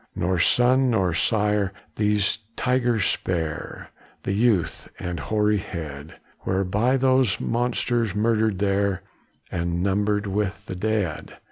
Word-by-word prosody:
Nor 90 0 0
son, 125 +7 +4
nor 95 -7 +1
sire, 105 +1 +1 0.2
these 105 -1 +1 0.2
tigers 125 -4 +1
spare, 80 -4 -3 0.3
The - - -2
youth, 105 -4 +1
and 90 -2 -4
hoary 105 +5 +1
head, 75 -4 -7 0.3
Were 95 +1 0
by 110 +8 +1
those 130 -6 +3
monsters 120 -3 0
murdered 110 -1 +2
there, 100 -1 0 0.5
And 85 0 -1
numbered 105 +1 +1
with 100 0 -2
the 95 - -6
dead. 100 -5 -2
105 Hz, 120 wpm, -24 LUFS, 95-110 Hz, 0.5 s, son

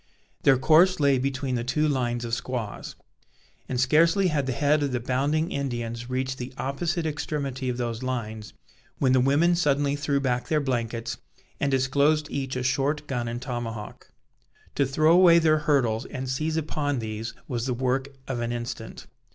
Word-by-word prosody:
Their 135 -1 +5
course 160 +7 +5
lay 140 -3 +3
between 130 0 -2
the 120 -1 -1
two 150 +5 +1
lines 120 -4 -1
of 115 - -5
squaws; 115 -3 -4 0.7
and 125 - -1
scarcely 165 +8 +4
had 145 -4 0
the - - 0
head 145 +4 +2
of 140 -3 -1
the 125 - 0
bounding 140 +7 0
Indians 120 -3 -3
reached 130 +1 -2
the 125 +1 -6
opposite 160 +5 -2
extremity 140 -4 -3
of 120 - -2
those 120 -1 -3
lines, 110 -4 -4 0.4
when 130 -2 +2
the 130 - +4
women 145 +7 +3
suddenly 145 -4 +1
threw 145 -1 0
back 125 -3 -1
their 155 - +2
blankets, 120 -3 -2 0.4
and 140 - +1
disclosed 140 +3 +2
each 135 -2 -3
a 125 - -2
short 140 +4 0
gun 120 -4 -3
and 120 +1 -4
tomahawk. 115 -4 -6 0.6
To 140 - +1
throw 155 +4 +3
away 175 -1 +7
their 155 -2 +4
hurdles 130 -6 +1
and 130 -1 -5
seize 155 +5 -1
upon 145 -2 -1
these, 110 0 -5
was 120 0 -2
the 125 - -1
work 130 +2 0 0.2
of 130 -3 -3
an 120 0 -2
instant. 120 0 -6
135 Hz, 175 wpm, -26 LUFS, 120-150 Hz, 0.7 s, away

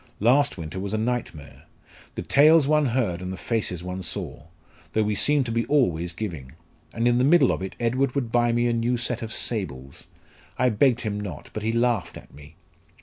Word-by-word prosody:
Last 135 +5 +3
winter 85 +2 -6
was 100 +2 -3
a - - 0
nightmare. 110 - -4 0.5
The - - -4
tales 150 +1 +5
one 150 -1 +3
heard, 115 -8 -1
and 90 0 -5
the 95 - -6
faces 95 -6 -3
one 90 +1 -5
saw! 75 -4 -7 0.5
though 110 - +2
we 105 0 0
seemed 145 +6 +3
to 115 - -4
be 115 +1 0
always 90 - +1
giving. 80 -9 -6 0.4
And 115 +1 0
in 120 0 +3
the - - +3
middle 165 +6 +5
of - - -3
it 95 - -6
Edward 125 +3 0
would 125 -5 -2
buy 120 0 +2
me 120 +1 +1
a 120 - +1
new 120 +1 0
set 120 0 -2
of 115 -1 -5
sables. 70 - -4 0.5
I 125 - +3
begged 120 +2 +2
him 105 -2 -3
not, 95 -8 -7
but 110 - -4
he 110 +1 -1
laughed 115 -7 0
at - - -15
me." 75 +3 -15
115 Hz, 205 wpm, -24 LUFS, 90-125 Hz, 0.5 s, tales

